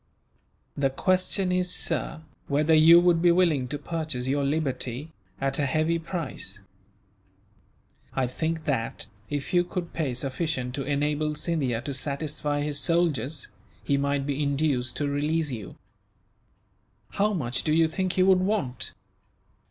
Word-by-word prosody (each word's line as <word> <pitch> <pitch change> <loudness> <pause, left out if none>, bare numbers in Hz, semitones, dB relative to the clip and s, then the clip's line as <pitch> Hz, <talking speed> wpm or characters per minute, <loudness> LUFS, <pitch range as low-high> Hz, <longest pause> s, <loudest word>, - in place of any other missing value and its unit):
"The 140 -1 +2
question 185 +5 +1
is, 180 0 +1
sir, 160 -2 -1 0.2
whether 150 +3 +2
you 160 +2 +8
would 175 -1 +3
be 175 0 +6
willing 165 -7 +3
to 145 +4 -3
purchase 155 -4 -3
your 140 +1 +1
liberty, 140 -1 -2 0.3
at 135 +1 0
a 140 - +2
heavy 155 +4 +1
price. 160 - -5 1.6
I 135 - +2
think 160 +5 -3
that, 115 -7 -1 0.2
if 145 +4 -3
you 175 0 +5
could 175 -1 -5
pay 140 -7 -1
sufficient 130 -1 -2
to 140 - -3
enable 150 +2 0
Scindia 140 -8 -1
to 140 - -3
satisfy 145 +2 -2
his 145 -1 -1
soldiers, 160 -4 +1 0.4
he 140 - +1
might 140 0 0
be 145 0 -1
induced 140 -3 0
to 145 - -1
release 150 +2 0
you." 110 -6 -6 1.3
"How 210 +2 +1
much 130 -8 -1
do 155 - 0
you 165 +1 +4
think 185 +3 -1
he 185 - +3
would 190 -1 +5
want?" 185 - -1
150 Hz, 145 wpm, -26 LUFS, 135-165 Hz, 1.6 s, you